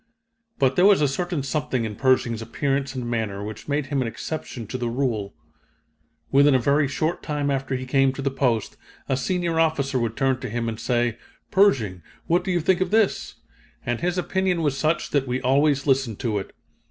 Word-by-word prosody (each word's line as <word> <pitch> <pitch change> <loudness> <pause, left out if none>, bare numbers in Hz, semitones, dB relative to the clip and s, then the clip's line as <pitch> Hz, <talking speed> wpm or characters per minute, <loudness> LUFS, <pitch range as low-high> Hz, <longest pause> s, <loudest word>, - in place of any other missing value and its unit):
But 135 -1 +2
there 180 +2 +6
was 205 -2 +6
a 150 - +3
certain 165 +2 -2
something 135 -4 -1
in 105 -1 -5
Pershing's 120 -2 +2
appearance 135 +4 -2
and 125 -2 -4
manner 110 -4 -2
which 110 +1 -8
made 145 0 0
him 135 0 -1
an 125 - -1
exception 125 -1 -5
to 130 - -5
the 120 -1 -1
rule. 115 - -2 1.0
Within 140 0 +5
a - - +4
very 140 +4 +2
short 155 +5 -1
time 145 -2 -1
after 135 -1 -1
he 130 0 -4
came 135 +1 +3
to 135 - -6
the 140 - 0
post, 125 -5 0 0.3
a 135 - +1
senior 170 +3 -1
officer 140 -5 +1
would 115 -1 -2
turn 135 -2 +1
to 130 -2 -5
him, 115 +1 -2
and 110 -1 -4
say: 120 -1 0 0.3
'Pershing, 120 - +3 0.2
what 175 +2 +2
do - - -4
you 175 -2 +1
think 185 +3 +2
of 185 - +1
this?' 215 -1 +1 0.5
and 120 -1 -2
his 180 +1 0
opinion 180 -1 0
was 145 -3 +1
such 155 +4 0
that 140 -2 +1
we 125 +1 -1
always 140 +2 +2
listened 135 -6 +1
to 110 -4 0
it. 95 - -9
135 Hz, 200 wpm, -24 LUFS, 120-155 Hz, 1.0 s, there